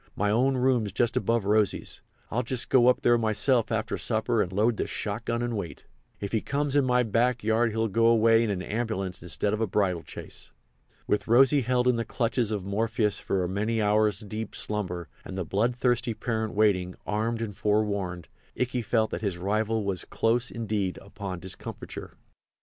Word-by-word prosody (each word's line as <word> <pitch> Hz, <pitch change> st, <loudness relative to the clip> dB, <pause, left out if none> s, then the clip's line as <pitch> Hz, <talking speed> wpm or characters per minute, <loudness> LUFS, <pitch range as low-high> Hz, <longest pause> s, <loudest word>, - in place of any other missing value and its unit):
My 105 Hz, 0 st, +1 dB
own 130 Hz, +4 st, +2 dB
room's 125 Hz, -5 st, +2 dB
just 120 Hz, +4 st, 0 dB
above 115 Hz, -3 st, +1 dB
Rosy's. 105 Hz, -1 st, 0 dB, 0.3 s
I'll 120 Hz, -, +1 dB
just 125 Hz, 0 st, -3 dB
go 125 Hz, -2 st, +5 dB
up 125 Hz, -, +3 dB
there 120 Hz, 0 st, +4 dB
myself 115 Hz, +2 st, +1 dB
after 110 Hz, -1 st, -1 dB
supper 110 Hz, 0 st, +1 dB
and 90 Hz, -, -2 dB
load 105 Hz, +4 st, +2 dB
the -, -, -1 dB
shot 110 Hz, +2 st, -4 dB
gun 120 Hz, +1 st, -1 dB
and 120 Hz, -1 st, -2 dB
wait. 100 Hz, -5 st, -6 dB, 0.3 s
If 100 Hz, -, -4 dB
he 110 Hz, -, +1 dB
comes 145 Hz, 0 st, -1 dB
in 145 Hz, -2 st, +4 dB
my 125 Hz, -1 st, +3 dB
back 120 Hz, +2 st, +1 dB
yard 110 Hz, +2 st, +2 dB
he'll 110 Hz, +1 st, 0 dB
go 115 Hz, +3 st, +2 dB
away 115 Hz, 0 st, +5 dB
in 100 Hz, -5 st, -1 dB
a -, -, -7 dB
ambulance 100 Hz, -5 st, -3 dB
instead 95 Hz, +4 st, -1 dB
of 110 Hz, -, -1 dB
a 110 Hz, -, +1 dB
bridal 90 Hz, -3 st, +1 dB
chaise." -, -, -9 dB, 0.5 s
With 105 Hz, -, 0 dB
Rosy 135 Hz, +5 st, +5 dB
held 125 Hz, +1 st, +1 dB
in 125 Hz, -2 st, +3 dB
the 115 Hz, -, 0 dB
clutches 115 Hz, 0 st, -1 dB
of 105 Hz, -4 st, -3 dB
Morpheus 105 Hz, +1 st, 0 dB
for 95 Hz, -2 st, -1 dB
a -, -, -1 dB
many 105 Hz, +5 st, -1 dB
hours 105 Hz, -1 st, +2 dB
deep 110 Hz, +1 st, -6 dB
slumber, 90 Hz, -5 st, -3 dB, 0.2 s
and 95 Hz, -, -7 dB
the 95 Hz, -, -2 dB
bloodthirsty 120 Hz, +4 st, 0 dB
parent 110 Hz, -1 st, -2 dB
waiting, 95 Hz, -4 st, +2 dB
armed 110 Hz, +2 st, -1 dB
and 110 Hz, -3 st, -4 dB
forewarned, 100 Hz, -5 st, -1 dB, 0.3 s
Ikey 125 Hz, 0 st, 0 dB
felt 110 Hz, -1 st, +1 dB
that -, -, -3 dB
his 100 Hz, -5 st, -2 dB
rival 110 Hz, +4 st, 0 dB
was 95 Hz, -4 st, -2 dB
close, 120 Hz, +2 st, 0 dB
indeed, 105 Hz, -5 st, -2 dB
upon 95 Hz, -2 st, -7 dB
discomfiture. 95 Hz, +1 st, -7 dB
110 Hz, 190 wpm, -27 LUFS, 100-120 Hz, 0.5 s, go